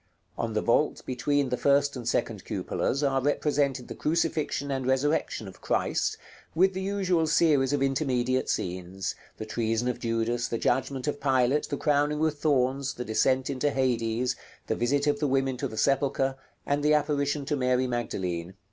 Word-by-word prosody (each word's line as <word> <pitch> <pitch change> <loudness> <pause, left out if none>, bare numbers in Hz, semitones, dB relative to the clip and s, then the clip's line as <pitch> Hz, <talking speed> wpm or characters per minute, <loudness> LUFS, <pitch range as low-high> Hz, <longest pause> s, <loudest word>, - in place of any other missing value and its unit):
On 115 -1 -3
the 110 - 0
vault 150 +6 +2
between 140 +2 0
the 125 - -1
first 140 +1 +3
and 120 -2 -3
second - - -1
cupolas 140 +3 -2
are 135 -1 +2
represented 140 -2 0
the - - -6
crucifixion 155 -3 -1
and 130 -2 -2
resurrection 130 -4 0
of 95 - -12
Christ, - - 0 0.4
with 190 +3 +4
the 190 - -3
usual 190 -4 +1
series 150 -4 +3
of 145 -1 +1
intermediate 130 -2 0
scenes, 90 +1 -3 0.2
the 110 - -5
treason 115 +1 -1
of 125 - -2
Judas, 115 +1 -1
the 115 - -2
judgment 130 +2 0
of 145 -1 -2
Pilate, 135 +1 +2
the 145 - -2
crowning 150 0 +1
with 155 -1 0
thorns, 135 -2 +1
the 125 - -5
descent 130 +4 +2
into 140 +2 0
Hades, 125 -2 0 0.3
the - - -1
visit 140 +4 +1
of 145 -1 +1
the 150 - +1
women 135 -1 +1
to - - -2
the 110 - -9
sepulchre, 135 0 +1 0.3
and 145 +1 0
the 150 +1 +4
apparition 145 -1 0
to 150 - 0
Mary 130 -1 +1
Magdalene. 95 -8 -3
135 Hz, 175 wpm, -27 LUFS, 120-145 Hz, 0.4 s, with